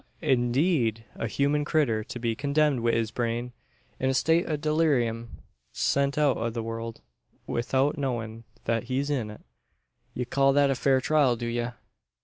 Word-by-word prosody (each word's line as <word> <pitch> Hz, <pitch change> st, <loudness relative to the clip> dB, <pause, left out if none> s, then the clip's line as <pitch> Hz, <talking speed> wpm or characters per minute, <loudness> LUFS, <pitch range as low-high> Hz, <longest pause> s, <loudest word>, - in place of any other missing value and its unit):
"I'deed. 120 Hz, -, +1 dB
A 115 Hz, -, -3 dB
human 145 Hz, +5 st, +1 dB
critter 135 Hz, -8 st, +1 dB
to -, -, -7 dB
be 115 Hz, -1 st, -1 dB
condemned 145 Hz, +1 st, +1 dB
wi' 115 Hz, 0 st, +1 dB
his 115 Hz, -1 st, 0 dB
brain 120 Hz, +1 st, -2 dB, 0.5 s
in 130 Hz, -, +1 dB
a 135 Hz, -, +1 dB
state 165 Hz, +6 st, +2 dB
o' 155 Hz, -, 0 dB
dulleerium! 145 Hz, -7 st, +1 dB, 0.5 s
Sent 140 Hz, +1 st, +1 dB
out 145 Hz, -3 st, +3 dB
o' 115 Hz, +1 st, -1 dB
the 115 Hz, 0 st, -4 dB
world 115 Hz, 0 st, -5 dB, 0.5 s
'ithout 135 Hz, +5 st, 0 dB
knowin' 115 Hz, -4 st, -3 dB, 0.2 s
that 115 Hz, -1 st, 0 dB
he's 135 Hz, +3 st, -1 dB
in 125 Hz, -7 st, -1 dB
it! 105 Hz, -, -11 dB, 0.7 s
Ye 125 Hz, -, -2 dB
call 135 Hz, +2 st, +3 dB
that 140 Hz, -1 st, +4 dB
a -, -, +3 dB
fair 130 Hz, 0 st, +2 dB
trial, 140 Hz, -3 st, +3 dB
do 120 Hz, -, -5 dB
ye?" 120 Hz, 0 st, -1 dB
125 Hz, 165 wpm, -27 LUFS, 115-140 Hz, 0.7 s, that